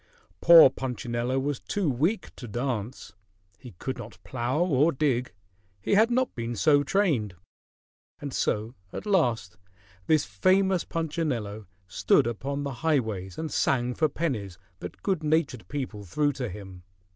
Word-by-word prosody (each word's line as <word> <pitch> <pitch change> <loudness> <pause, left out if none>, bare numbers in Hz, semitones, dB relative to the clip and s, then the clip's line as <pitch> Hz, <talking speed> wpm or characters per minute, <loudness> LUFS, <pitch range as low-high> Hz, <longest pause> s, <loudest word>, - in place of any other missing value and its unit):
Poor 165 -5 +9
Punchinello 125 -1 -3
was 140 +1 -1
too 200 -4 -2
weak 155 - -1
to 125 - -9
dance; 120 +1 -4 0.5
he 125 -4 -12
could 130 +5 -5
not 110 -1 -9
plow 125 +2 -2
or 160 -3 +3
dig; 130 -4 0 0.5
he 95 - -1
had 220 +3 +5
not 255 +1 0
been 120 0 -4
so 145 +5 +4
trained. 145 - 0 0.8
And 140 -2 -6
so 110 +3 -1 0.2
at - - -7
last 120 - +1 0.5
this 155 -2 +3
famous 185 - +2
Punchinello 135 -11 -3 0.2
stood 95 +2 +2
upon 135 +5 -3
the 140 -1 -4
highways 110 - -1
and 160 -2 -4
sang 125 -2 +1
for 155 +4 +1
pennies 115 - -3 0.2
that - - -9
good 190 -5 0
natured 150 -6 0
people 130 -7 -5
threw 145 - 0
to 125 -3 -4
him. 95 -2 -10
130 Hz, 145 wpm, -27 LUFS, 115-160 Hz, 0.8 s, Poor